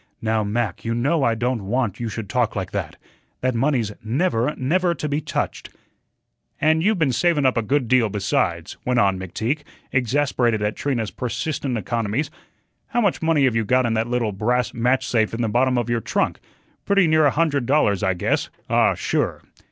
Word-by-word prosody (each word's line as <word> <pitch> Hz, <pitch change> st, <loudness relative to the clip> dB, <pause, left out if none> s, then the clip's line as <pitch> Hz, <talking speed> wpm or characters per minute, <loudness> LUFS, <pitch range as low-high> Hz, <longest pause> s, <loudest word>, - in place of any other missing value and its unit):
"Now, 110 Hz, -1 st, 0 dB
Mac, 105 Hz, -2 st, -2 dB
you 115 Hz, 0 st, -1 dB
know 140 Hz, +6 st, +1 dB
I 115 Hz, -2 st, +2 dB
don't 120 Hz, -3 st, -2 dB
want 115 Hz, -3 st, -1 dB
you 120 Hz, -1 st, -3 dB
should 110 Hz, 0 st, -5 dB
talk 120 Hz, +1 st, 0 dB
like 95 Hz, -3 st, -3 dB
that. -, -, -4 dB, 0.5 s
That 130 Hz, 0 st, +1 dB
money's 120 Hz, -3 st, +1 dB
never, 125 Hz, +2 st, 0 dB
never 170 Hz, +6 st, +1 dB
to 150 Hz, -, -3 dB
be 145 Hz, +1 st, -1 dB
touched." -, -, -3 dB, 0.9 s
"And 160 Hz, +1 st, +3 dB
you've 210 Hz, +4 st, +2 dB
been 150 Hz, -6 st, +2 dB
savun 145 Hz, +4 st, +2 dB
up 130 Hz, -, +3 dB
a 115 Hz, -, +2 dB
good 130 Hz, +3 st, 0 dB
deal, 120 Hz, -2 st, +3 dB
besides," 95 Hz, -4 st, -1 dB
went 125 Hz, -1 st, +1 dB
on 95 Hz, -2 st, +2 dB
McTeague, 110 Hz, -, -2 dB, 0.3 s
exasperated 125 Hz, -3 st, +1 dB
at 105 Hz, +1 st, -1 dB
Trina's 120 Hz, -7 st, -2 dB
persistent 125 Hz, +1 st, -3 dB
economies. 115 Hz, -, -2 dB, 0.6 s
"How 240 Hz, -2 st, 0 dB
much 200 Hz, -5 st, +1 dB
money 160 Hz, -3 st, +2 dB
have 130 Hz, -4 st, +3 dB
you 115 Hz, -, +2 dB
got 125 Hz, +4 st, +2 dB
in 115 Hz, -, 0 dB
that 110 Hz, +1 st, 0 dB
little 120 Hz, -3 st, 0 dB
brass 120 Hz, +5 st, 0 dB
match 125 Hz, +3 st, +1 dB
safe 110 Hz, -2 st, +1 dB
in 120 Hz, -, -2 dB
the -, -, +1 dB
bottom 125 Hz, +3 st, +2 dB
of 120 Hz, -2 st, 0 dB
your 120 Hz, -1 st, 0 dB
trunk? -, -, -1 dB, 0.4 s
Pretty 200 Hz, -2 st, +3 dB
near 155 Hz, -2 st, +4 dB
a -, -, +5 dB
hundred 145 Hz, -5 st, 0 dB
dollars, 120 Hz, -9 st, +2 dB
I 95 Hz, -1 st, +1 dB
guess 90 Hz, -, 0 dB, 0.2 s
ah, -, -, +4 dB
sure." -, -, -1 dB
120 Hz, 190 wpm, -22 LUFS, 110-145 Hz, 0.9 s, a